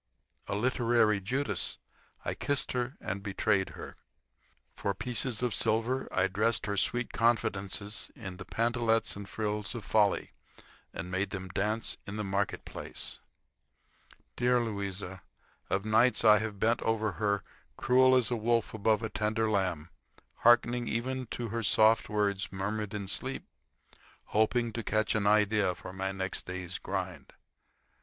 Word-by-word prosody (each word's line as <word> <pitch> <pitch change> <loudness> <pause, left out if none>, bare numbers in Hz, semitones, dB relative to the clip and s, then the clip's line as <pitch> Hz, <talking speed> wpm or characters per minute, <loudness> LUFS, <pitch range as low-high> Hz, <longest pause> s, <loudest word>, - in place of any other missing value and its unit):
A - - -2
literary 115 -2 +2
Judas, 110 -1 -1 0.5
I - - -1
kissed 145 -1 -1
her 125 +1 -2
and 100 +2 -4
betrayed 100 -1 0
her. - - -9 0.8
For 100 - -2
pieces 125 +2 0
of 120 -3 +1
silver 115 +6 +1
I 95 - +2
dressed 105 +4 +1
her 100 -1 -1
sweet 120 +5 +2
confidences 105 -3 0
in 95 -5 -7
the 95 - -8
pantalettes 115 -1 +1
and 100 0 -8
frills 105 -1 -3
of 110 -4 -6
folly 105 -2 +2 0.6
and 90 +2 -6
made 95 +2 0
them 95 -1 -5
dance 105 +5 -1
in 100 - -5
the 105 - -2
market 100 0 -1
place. - - -6 1.2
Dear 125 0 +3
Louisa! 100 -4 -4 0.5
Of 95 +1 0
nights 115 +3 +3
I 105 -1 +8
have 105 -2 -4
bent 115 +3 +2
over 110 -1 0
her 100 -1 +1 0.3
cruel 130 +1 +5
as 125 -2 +2
a - - +2
wolf 115 0 0
above 110 0 +1
a - - 0
tender 110 +1 0
lamb, 90 -5 -1 0.5
hearkening 120 0 +4
even 130 +2 -2
to 120 0 -4
her 115 +2 -2
soft 110 +1 +4
words 100 -2 0
murmured 105 +2 -3
in 100 -2 -4
sleep, 130 +7 -1 0.8
hoping 115 +2 +1
to 115 - -3
catch 110 0 +1
an 105 -2 +1
idea 105 -3 +3
for 90 - -9
my 95 0 -2
next 95 -1 -3
day's 90 -1 -5
grind. - - -5
110 Hz, 150 wpm, -30 LUFS, 100-115 Hz, 1.2 s, I